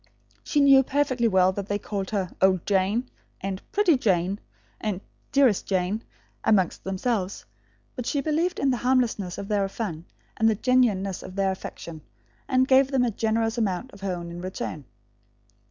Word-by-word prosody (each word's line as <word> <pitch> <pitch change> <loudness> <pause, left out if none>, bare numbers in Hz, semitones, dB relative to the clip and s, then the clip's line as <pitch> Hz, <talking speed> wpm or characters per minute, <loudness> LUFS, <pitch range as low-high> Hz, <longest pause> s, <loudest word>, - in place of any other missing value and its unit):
She 295 - +1
knew 275 -1 +7
perfectly 265 -3 +1
well 190 -3 +4
that 200 +1 -5
they 205 - 0
called 200 -2 -4
her 195 -4 -2
"old 185 -2 +3
Jane" 205 +5 +1 0.3
and 195 0 -4
"pretty 380 -8 +4
Jane" 190 -2 +1 0.4
and 210 -4 -2 0.3
"dearest 265 -8 +3
Jane" 190 +3 0 0.4
amongst 195 -5 +2
themselves, 195 0 -2 0.5
but 250 -3 -5
she 285 - 0
believed 320 +5 0
in 275 - +2
the 250 - 0
harmlessness 240 -8 0
of 200 - -5
their 200 -2 0
fun 180 -7 -5 0.3
and 225 0 +4
the 220 - +2
genuineness 210 -6 +1
of 185 - -10
their 195 -1 +1
affection, 170 -3 -8 0.5
and 260 -1 +3
gave 265 0 +5
them 265 -2 +2
a 235 - 0
generous 225 +2 0
amount 210 +3 -1
of 200 - -14
her 190 -2 -2
own 170 -1 -7
in 175 0 -7
return. 180 -5 -5
205 Hz, 170 wpm, -25 LUFS, 190-255 Hz, 0.5 s, knew